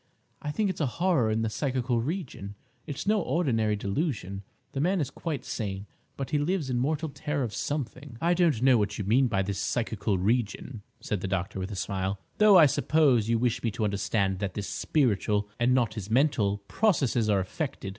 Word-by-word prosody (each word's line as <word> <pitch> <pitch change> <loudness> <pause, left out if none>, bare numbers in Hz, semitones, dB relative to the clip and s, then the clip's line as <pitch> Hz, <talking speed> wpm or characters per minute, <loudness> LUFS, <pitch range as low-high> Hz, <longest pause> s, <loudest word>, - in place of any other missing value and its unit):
I 150 - -4
think 200 +6 0
it's 165 - -6
a 145 - +2
horror 170 -10 +2
in 110 +1 0
the 110 - 0
psychical 125 -2 0
region. 130 - -5 0.3
It's 145 - -5
no 210 0 +3
ordinary 115 -12 +1
delusion; 100 - -2 0.3
the 135 - -4
man 185 +4 +2
is 145 - -2
quite 155 -5 -4
sane; 100 -3 -4 0.3
but 135 0 -4
he 150 - +2
lives 150 -2 -1
in 120 - 0
mortal 155 +4 -1
terror 145 0 -3
of 115 -4 -4
something—" 140 -3 -4
"I 170 +5 +2
don't 165 -9 +2
know 130 -3 +6
what 105 - -1
you 105 - -2
mean 125 +6 +4
by 95 -4 0
his 100 0 -3
'psychical 110 -4 -1
region,'" 110 +3 -1 0.2
said 105 -4 -2
the 95 - -2
doctor, 95 0 -2
with 95 +1 -4
a 105 - -5
smile; 95 +1 -2 0.2
"though 210 -2 +8
I 165 - +9
suppose 135 -6 +3
you 115 - +3
wish 120 0 0
me 115 - 0
to 110 +1 -3
understand 100 -1 0
that 100 -2 -3
his 105 - -3
spiritual, 105 -2 +1
and 125 +2 +3
not 120 -4 +1
his 105 -3 -6
mental, 110 -6 +2
processes 135 - +2
are 100 -2 +3
affected. 100 - -4
120 Hz, 200 wpm, -28 LUFS, 105-150 Hz, 0.3 s, I